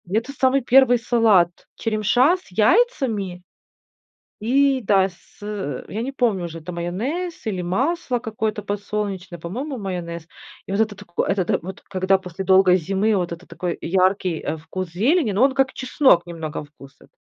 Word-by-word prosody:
Это 225 +7 -1
самый 265 0 +2
первый 250 0 +5
салат- 220 -7 +2
черемша 230 - +2
с 365 - -21
яйцами 220 - +1 1.0
и, 270 +4 +3
да, 195 -2 +3
с, 180 -1 -22
э, 205 -7 -4
я 215 +3 -4
не 265 +3 -4
помню 225 -9 0
уже, 165 -1 -6
это 160 - -8
майонез 240 - -3
или 195 -4 -2
масло 255 - 0
какое-то 220 -2 -3
подсолнечное, 200 -3 -4
по-моему, 250 - -5
майонез. 170 -5 -5 0.4
И - - -5
вот 200 - +1
это 220 -1 +1
тако 190 -4 -3
это 195 -2 0
та - - +1
вот 190 +3 -8
когда 190 0 +1
после 185 0 -7
долгой 190 -1 +5
зимы, 195 +5 +1
вот 175 -2 -1
это 170 +2 -9
такой 175 -2 -4
яркий, 185 -1 +1
э, 155 - -3
вкус 180 +3 -6
зелени, 235 - +2
но 200 +5 +1
он 270 -1 +2
как 270 -1 +2
чеснок 255 - +3
немного 160 -3 -5
вкус 140 -2 -16
этот. - - -20
200 Hz, 165 wpm, -22 LUFS, 180-245 Hz, 1.0 s, первый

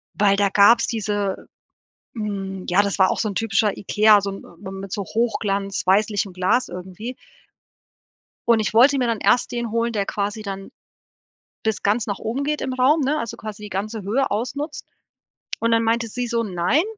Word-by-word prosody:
weil 200 -1 +4
da 200 0 +2
gab's 205 +4 +5
diese 205 -3 -2 0.7
hm, 195 -4 -4
ja, 180 +3 +4
das 200 -1 -2
war 190 0 +5
auch - - -2
so 215 - 0
'n 200 - -6
typischer 210 -1 +1
IKEA, 210 +1 +4
so 200 0 -3
'n 195 - -9 0.2
m 190 0 -6
mit 195 -1 -8
so 200 - -2
Hochglanz-weißlichem 200 -2 0
Glas 185 +8 +1
irgendwie. 185 +7 -7 1.3
Und 230 -2 +5
ich 215 - -2
wollte 265 +5 +6
mir 250 -2 +1
dann 230 -2 -1
erst 245 - +2
den 235 -2 -3
holen, 230 +1 0
der 205 -3 -1
quasi 205 +2 -3
dann 195 -2 -7 0.9
bis 220 -2 -1
ganz 210 +3 +1
nach 200 - -3
oben 245 +6 -3
geht 300 +1 -1
im 260 - -3
Raum, 265 +5 +3
ne, 290 +2 +1
also, 230 -5 -4
quasi 210 -1 -7
ganze 205 +3 -4
Höhe 245 +8 0
ausnutzt, 280 +8 -3 0.7
und 230 0 +1
dann 230 0 +3
meinte 230 +1 +1
sie 245 +3 -3
so: 235 0 0
„Nein, 185 - +1
215 Hz, 180 wpm, -22 LUFS, 195-235 Hz, 1.3 s, wollte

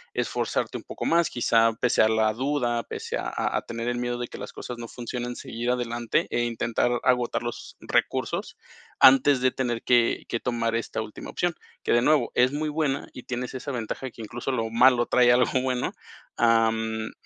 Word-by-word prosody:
Esforzarte - - -1
un - - -14
poco - - -6
más, 170 0 +3
quizá 115 -1 +3
pese 125 - +3
a 110 - +5
la 110 -1 +2
duda, 125 -1 0
pese - - -5
a - - -3 0.3
a - - -1
tener 115 0 -5
el 120 - -2
miedo 120 0 -2
de 120 0 -4
que - - -10
las - - -7
cosas 125 - -7
no 115 - -6
funcionen, 120 +1 -5
seguir 120 +1 -4
adelante 120 -2 0
e 120 - +1
intentar 120 +1 0
agotar 125 -2 +1
los 120 -1 -7
recursos - - -1 0.4
antes 135 +1 +7
de 130 0 +2
tener 120 -3 -2
que 120 -2 +2
que 115 - -2
tomar 115 -2 -1
esta 115 -1 -3
última 110 -1 -8
opción. 175 -1 -1 0.3
Que, - - +1
de 120 - +4
nuevo, 150 +3 +3
es 125 +1 +3
muy 150 +1 -2
buena 150 -2 -1
y 125 - -9
tienes 125 0 -4
esa 130 +2 -5
ventaja 125 +2 -4
que 115 - -10
incluso 120 +4 -4
lo 115 -3 -1
malo 120 +1 +5
trae 125 0 +4
algo 125 +1 +3
bueno, 125 -1 -1 0.5
am, 110 -1 +2
120 Hz, 190 wpm, -26 LUFS, 115-130 Hz, 0.5 s, antes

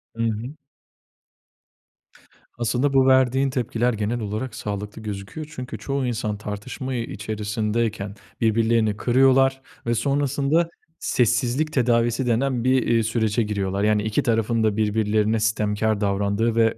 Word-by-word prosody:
Hı 115 - -2
hı. 115 +3 -2 2.1
Aslında 125 +4 0
bu 135 -1 +5
verdiğin 130 +1 +4
tepkiler 125 -2 0
genel 110 +3 -2
olarak 110 +3 -4
sağlıklı 105 +1 -5
gözüküyor. 105 +8 -6
Çünkü 125 -4 -6
çoğu 135 +5 -2
insan 110 -3 -2
tartışma, 105 +6 -6
ııı, - - -2
içerisindeyken 105 -1 -2 0.3
birbirlerini 110 -1 +2
kırıyorlar 135 +2 +3 0.2
ve 120 0 +1
sonrasında 140 +6 +1 0.3
sessizlik 125 +5 +1
tedavisi 120 0 +2
denen 125 +1 +1
bir, 130 0 +3
iii, 115 -1 +3
sürece 110 0 +1
giriyorlar. 100 -2 -2
Yani 105 0 +2
iki 110 0 0
tarafın 115 -1 +1
da 110 -1 +1
birbirlerine 110 0 +1
sitemkâr 110 0 0
davrandığı 100 +3 0
ve 115 -1 +3
115 Hz, 125 wpm, -23 LUFS, 105-130 Hz, 2.1 s, bu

